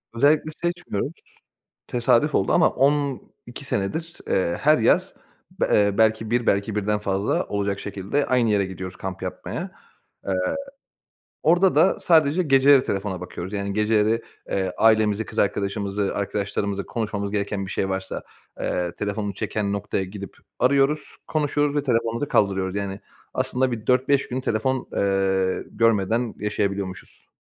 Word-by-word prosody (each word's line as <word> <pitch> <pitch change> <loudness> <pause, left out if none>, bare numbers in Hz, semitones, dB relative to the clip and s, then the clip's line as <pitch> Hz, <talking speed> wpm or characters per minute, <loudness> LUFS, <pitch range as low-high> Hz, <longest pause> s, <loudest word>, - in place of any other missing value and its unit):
Özellikle 150 +5 +3
seçmiyoruz. 175 - -2 0.8
Tesadüf 125 +4 +2
oldu 95 - +2
ama - - +5
12 140 -1 -1
senedir, 160 +11 -3
eee, 85 -2 +1
her 155 +1 +5
yaz, 115 - +2 0.5
b - - +3
eee, 100 -1 +2
belki 110 0 +2
1, 120 -1 +1
belki 100 +2 +1
birden 105 0 0
fazla 100 0 0
olacak 100 -1 -2
şekilde 100 +8 -2
aynı 125 -3 +2
yere 100 -2 +2
gidiyoruz 95 0 -7
kamp 95 -1 -6
yapmaya. - - -5 0.6
Eee, 95 - +1 1.1
orada 175 +3 +4
da 190 - +4
sadece 160 +1 +3
geceleri 135 -1 +5
telefona 95 -2 -3
bakıyoruz. 90 +2 -7
Yani, 100 -1 -2
geceleri, 110 +1 +2 0.3
eee, 95 -2 0
ailemizi, 110 -1 +3
kız - - -5
arkadaşımızı, 100 0 -1
arkadaşlarımızla 100 -1 -2
konuşmamız 105 -3 -3
gereken 100 -1 -2
bir 95 - -6
şey 95 - -1
varsa, 95 0 -4 0.4
eee, 90 -1 -1
telefonu 105 0 -2
çeken 100 -2 -2
noktaya 100 -1 -2
gidip 100 0 -8 0.2
arıyoruz, 140 +4 +2
konuşuyoruz 145 -1 0
ve 145 - +1
telefonu 115 -2 0
da 145 - -1
kaldırıyoruz. 95 -4 +1
Yani, 100 -1 -3 0.3
aslında 130 0 0
bir 115 -1 -5
4-5 130 +2 +3
gün 130 +1 -3
telefon, 130 +3 -1
eee, 95 -1 +1
görmeden 115 +1 +1
yaşayabiliyormuşuz. 100 -3 -3
105 Hz, 140 wpm, -24 LUFS, 100-130 Hz, 1.1 s, ama